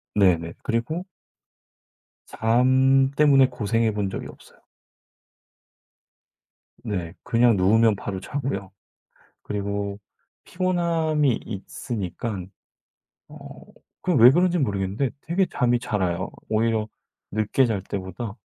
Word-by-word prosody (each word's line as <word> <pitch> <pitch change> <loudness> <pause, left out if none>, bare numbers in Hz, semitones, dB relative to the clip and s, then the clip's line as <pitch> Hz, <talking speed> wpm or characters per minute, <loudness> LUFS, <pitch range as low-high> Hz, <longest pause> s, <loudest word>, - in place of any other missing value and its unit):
네네. 85 -5 +2
그리고 155 +11 -2 1.2
잠 130 +3 +3
때문에 140 -3 +5
고생해 115 -2 0
본 100 -2 -1
적이 - - -6
없어요. - - -16 2.2
네. 90 -5 -4
그냥 120 -1 +3
누우면 110 +4 +4
바로 95 -1 -5
자고요. 100 -3 -4 0.7
그리고 100 0 -3 0.5
피곤함이 165 -7 0
있으니깐 100 -2 -5 0.8
어 - - -12 0.4
그 180 - +3
왜 120 0 +9
그런지 175 +3 +2
모르겠는데 100 - -1
되게 180 +4 +1
잠이 120 -5 +1
잘 105 -4 -2
와요. 90 +1 -1 0.2
오히려 110 0 +1 0.4
늦게 110 +5 +1
잘 110 -5 -1
때보다 95 +3 -6
115 Hz, 215 characters per minute, -24 LUFS, 100-135 Hz, 2.2 s, 왜